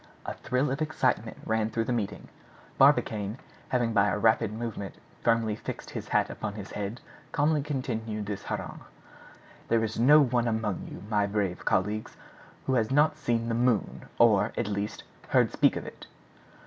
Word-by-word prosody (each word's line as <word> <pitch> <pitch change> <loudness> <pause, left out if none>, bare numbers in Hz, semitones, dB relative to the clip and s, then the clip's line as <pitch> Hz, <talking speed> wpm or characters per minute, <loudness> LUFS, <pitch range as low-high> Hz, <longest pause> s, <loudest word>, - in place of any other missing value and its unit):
A - - -3
thrill 130 +2 -1
of 135 +3 -2
excitement 130 -7 0
ran 110 -1 +1
through 115 +1 -1
the 125 - -1
meeting. 110 -5 -3 0.5
Barbicane, 105 +1 +3 0.3
having 120 -3 +1
by 100 -2 +4
a 105 - 0
rapid 110 -1 +3
movement 110 -3 -5 0.3
firmly 115 -2 +2
fixed - - -7
his - - -6
hat - - +2
upon 105 -2 -5
his 105 -2 -8
head, 105 +4 -4 0.3
calmly 150 0 +2
continued 115 -7 -3
his 105 -1 -4
harangue: - - -5 0.9
"There 115 -1 +2
is 110 0 -3
no 145 +6 +7
one 120 -4 +2
among 110 -4 -1
you, - - -9
my 105 -2 +1
brave 100 -3 -2
colleagues, 105 +3 0 0.5
who 130 - 0
has 115 -4 +2
not 150 +3 +4
seen 120 -6 -1
the 115 - 0
Moon, 120 -2 +1
or, 105 -3 +4
at - - 0
least, 105 +1 -3 0.3
heard - - +4
speak - - +3
of - - -4
it. - - -10
115 Hz, 170 wpm, -28 LUFS, 105-125 Hz, 0.9 s, no